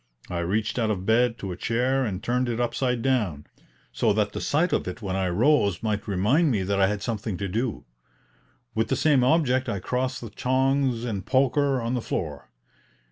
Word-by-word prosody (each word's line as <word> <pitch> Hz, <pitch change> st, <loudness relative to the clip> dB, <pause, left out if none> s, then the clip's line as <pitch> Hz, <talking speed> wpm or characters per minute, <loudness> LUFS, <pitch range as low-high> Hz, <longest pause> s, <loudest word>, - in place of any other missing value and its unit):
I 85 Hz, -, -2 dB
reached 105 Hz, +7 st, -1 dB
out 110 Hz, -2 st, +1 dB
of 95 Hz, -3 st, -2 dB
bed 115 Hz, +2 st, +3 dB
to 95 Hz, -4 st, -5 dB
a -, -, -4 dB
chair 125 Hz, +7 st, 0 dB
and 100 Hz, -2 st, -4 dB
turned 125 Hz, +1 st, 0 dB
it 120 Hz, 0 st, -2 dB
upside 120 Hz, 0 st, 0 dB
down, 105 Hz, -, 0 dB, 0.5 s
so -, -, +1 dB
that 105 Hz, 0 st, 0 dB
the -, -, -5 dB
sight 170 Hz, +5 st, +1 dB
of -, -, 0 dB
it 90 Hz, +4 st, -6 dB
when 95 Hz, -2 st, -2 dB
I 95 Hz, -1 st, 0 dB
rose 100 Hz, -, +2 dB
might 105 Hz, -2 st, -2 dB
remind 105 Hz, -, +2 dB
me 105 Hz, -7 st, 0 dB
that 100 Hz, +1 st, 0 dB
I 95 Hz, -, +5 dB
had 105 Hz, 0 st, -2 dB
something 110 Hz, -4 st, -3 dB
to 100 Hz, -, -3 dB
do. 115 Hz, +4 st, -2 dB, 0.9 s
With 110 Hz, 0 st, 0 dB
the -, -, 0 dB
same 145 Hz, -5 st, +3 dB
object 130 Hz, -2 st, +2 dB
I 100 Hz, -, -1 dB
crossed 125 Hz, +6 st, -2 dB
the 115 Hz, -3 st, -8 dB
tongs 130 Hz, 0 st, +1 dB
and 100 Hz, -5 st, -3 dB
poker 135 Hz, +2 st, +2 dB
on 115 Hz, +1 st, -2 dB
the 125 Hz, -, -1 dB
floor. 75 Hz, -10 st, -4 dB
115 Hz, 200 wpm, -25 LUFS, 100-130 Hz, 0.9 s, I